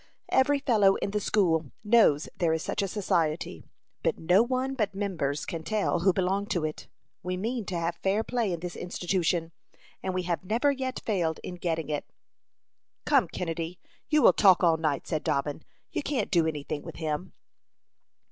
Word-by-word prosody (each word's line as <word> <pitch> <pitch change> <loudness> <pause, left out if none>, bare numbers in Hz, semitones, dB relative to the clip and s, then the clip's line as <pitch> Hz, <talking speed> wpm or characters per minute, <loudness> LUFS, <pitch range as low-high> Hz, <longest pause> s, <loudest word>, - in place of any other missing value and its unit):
Every 285 +2 +4
fellow 215 -8 +4
in 200 - -2
the 210 - 0
school 165 -8 +1
knows 210 -9 +4
there 165 -2 +1
is 160 - -1
such - - -1
a 200 - 0
society, 170 -5 -1 0.4
but - - 0
no 180 +5 +4
one 255 +2 0
but 210 -6 -1
members 170 -8 -2
can 165 - -4
tell 200 -1 0
who 190 +3 +4
belong 190 +2 0
to 175 -7 0
it. 155 - -5 0.3
We 180 +1 -3
mean 225 +3 -2
to 180 -1 -3
have 170 0 -2
fair 195 +5 +1
play 235 -5 -1
in 170 -2 -3
this 175 0 -5
institution, 175 -2 -1 0.5
and 190 -1 -3
we 185 - 0
have 175 0 -2
never 230 +9 +2
yet 260 -2 -3
failed 170 -7 0
in - - -5
getting 165 -3 -2
it." 150 -1 -3 1.0
"Come, - - +4
Kennedy, 165 0 -4 0.3
you 300 -1 +4
will - - +8
talk 190 -3 +5
all 165 -2 +5
night," 155 -4 -1
said 155 -3 -2
Dobbin. 145 +2 -1 0.3
"You - - -1
can't 285 -2 -2
do 170 -4 +3
any 150 -3 -3
thing 145 - -4
with - - -9
him." 160 +2 -3
180 Hz, 185 wpm, -28 LUFS, 165-210 Hz, 1.0 s, will